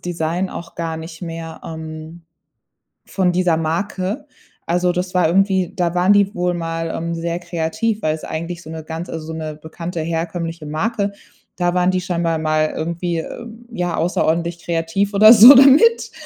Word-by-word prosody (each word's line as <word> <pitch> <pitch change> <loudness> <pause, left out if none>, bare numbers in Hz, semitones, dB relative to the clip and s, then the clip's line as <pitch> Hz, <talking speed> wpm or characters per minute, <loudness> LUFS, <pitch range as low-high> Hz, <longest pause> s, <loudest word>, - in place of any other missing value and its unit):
Design 175 +1 -2
auch 170 - -9
gar 165 -1 -3
nicht 160 0 -9
mehr, 165 -1 -7
ähm, 160 +1 -8 0.8
von 185 -2 0
dieser 175 -2 +2
Marke. 190 - -3 0.4
Also, 180 +1 +1
das 180 +1 -3
war 180 -3 +3
irgendwie 190 0 +1
da 175 -2 0
waren 180 +3 +4
die 200 0 +2
wohl 180 0 -1
mal, 165 -1 -3
ähm, 170 +1 -3
sehr 170 +1 -3
kreativ, 175 +6 -2
weil's 155 0 -1
eigentlich 170 +2 -5
so 160 - -11
'ne 160 -1 -7
ganz 165 +2 -6
also, 160 -1 -6
so - - -4
'ne 155 -1 -5
bekannte 165 +2 -6
herkömmliche 165 0 -4
Marke, 200 +7 -2 0.4
da 175 -1 0
waren 180 0 +2
die 185 - 0
scheinbar 170 -2 -1
mal 155 0 0
irgendwie, 170 +1 -2
äh, 235 +8 -7 0.3
ja, 175 -6 -2
außerordentlich 170 0 -1
kreativ 170 +4 -1
oder 215 +2 +8
so 240 +5 +10
damit. 280 - +6
170 Hz, 165 wpm, -19 LUFS, 165-185 Hz, 0.8 s, so